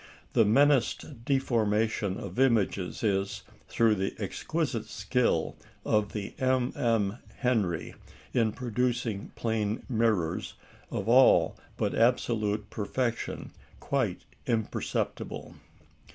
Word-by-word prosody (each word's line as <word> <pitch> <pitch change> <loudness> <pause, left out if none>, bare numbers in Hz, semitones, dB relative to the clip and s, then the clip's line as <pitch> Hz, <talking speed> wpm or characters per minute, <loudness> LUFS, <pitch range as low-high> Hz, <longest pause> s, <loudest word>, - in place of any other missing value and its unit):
The 115 - +5
menaced 135 0 +2
deformation 110 -6 +1
of - - -6
images 110 -8 +1
is, 100 -2 0 0.3
through 115 -2 +3
the 95 -1 -2
exquisite 120 - -2
skill 115 -7 0 0.3
of 105 -1 +1
the 100 -2 -4
MM. 120 -4 +1 0.2
Henry 105 -10 0 0.4
in 115 -3 +2
producing 120 -3 -2
plane 110 -1 -1
mirrors 110 -8 0 0.3
of 100 - -3
all 130 +3 +6 0.2
but - - 0
absolute 110 -3 +1
perfection, 115 +3 -2 0.3
quite - - -1 0.2
imperceptible. 115 -3 -2
115 Hz, 95 wpm, -29 LUFS, 105-125 Hz, 0.4 s, all